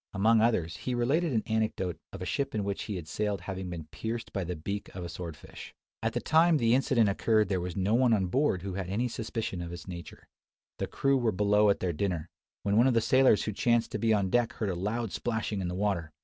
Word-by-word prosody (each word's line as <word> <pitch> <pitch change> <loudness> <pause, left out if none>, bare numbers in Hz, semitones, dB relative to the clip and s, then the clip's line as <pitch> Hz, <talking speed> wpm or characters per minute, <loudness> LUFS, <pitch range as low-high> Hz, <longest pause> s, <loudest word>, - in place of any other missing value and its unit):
Among 110 +3 +4
others, 85 -9 +1
he 125 +8 -3
related 145 +8 +1
an 110 -4 +1
anecdote 110 -5 -1 0.2
of 90 - -7
a - - -4
ship 140 +5 -2
in 105 - 0
which 100 0 -3
he 105 - -4
had 85 -4 -6
sailed 105 +2 -2
having 95 -1 -5
been 85 -3 -6
pierced 115 +1 -5
by 100 - -1
the 90 +1 -4
beak 100 +6 -5
of 90 - -5
a 85 - -5
sword 85 -2 -6
fish. - - -11 0.3
At 115 0 -1
the 120 - 0
time 160 +4 +4
the 115 -4 +3
incident 125 -4 +3
occurred 105 +1 +2
there 95 -3 0
was 90 -1 -4
no 95 +3 +1
one 125 0 +4
on 100 -4 +3
board 100 - +1
who 95 -1 -4
had 95 -1 -4
any 115 +6 0
suspicion 110 -5 -4
of 85 0 -6
its 85 +1 -8
nature. 85 -2 -9 0.5
The - - -1
crew 135 0 +1
were 120 -3 +2
below 105 +1 +3
at 100 - +1
their 90 -2 0
dinner; 85 -1 -2 0.3
when 100 +1 +1
one 120 +3 +6
of 130 - +2
the - - +5
sailors 130 0 +4
who 110 - -3
chanced 120 +3 +1
to - - -3
be 115 -1 +2
on 100 -3 +2
deck 120 -1 +2
heard 110 -4 -2
a - - -1
loud 105 +4 -2
splashing 110 -4 -2
in 90 - -2
the 90 - -3
water. 95 -5 -1
105 Hz, 250 wpm, -29 LUFS, 90-115 Hz, 0.5 s, one